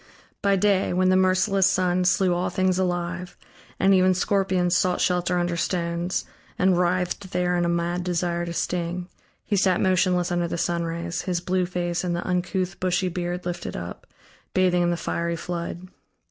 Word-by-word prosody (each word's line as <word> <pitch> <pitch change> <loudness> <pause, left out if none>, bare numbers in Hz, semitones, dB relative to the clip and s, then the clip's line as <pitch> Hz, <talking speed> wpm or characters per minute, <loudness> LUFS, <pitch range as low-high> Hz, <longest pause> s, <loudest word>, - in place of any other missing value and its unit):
By 200 -1 +3
day, 195 -1 +2
when 185 +1 +3
the 185 - +4
merciless 185 +1 +3
sun 185 -1 +1
slew 185 0 +3
all 175 +1 -1
things 185 -1 +1
alive, 180 0 -2 0.4
and 195 +1 +4
even 185 0 +4
scorpions 185 -2 +1
sought 180 +1 +2
shelter 180 0 +1
under 175 -1 0
stones 170 +1 -1 0.3
and 185 -1 +3
writhed 180 +2 0
there 180 0 +1
in 175 0 +1
a - - +1
mad 170 +1 -1
desire 175 -1 -1
to - - -4
sting, 175 +1 -2 0.4
he 205 - 0
sat 185 -2 +3
motionless 180 -1 +2
under 175 -1 0
the 170 - -3
sunrays, 170 0 -2
his 175 -1 +1
blue 180 +1 0
face 175 -1 -2
and 175 -1 -1
the 175 - -4
uncouth, 185 +1 -1
bushy 185 0 0
beard 175 0 -4
lifted 175 -1 -4
up, 85 0 -8 0.5
bathing 180 -1 +3
in 175 - +2
the 175 - 0
fiery 170 0 -2
flood. 170 +1 -5
180 Hz, 175 wpm, -24 LUFS, 175-185 Hz, 0.5 s, the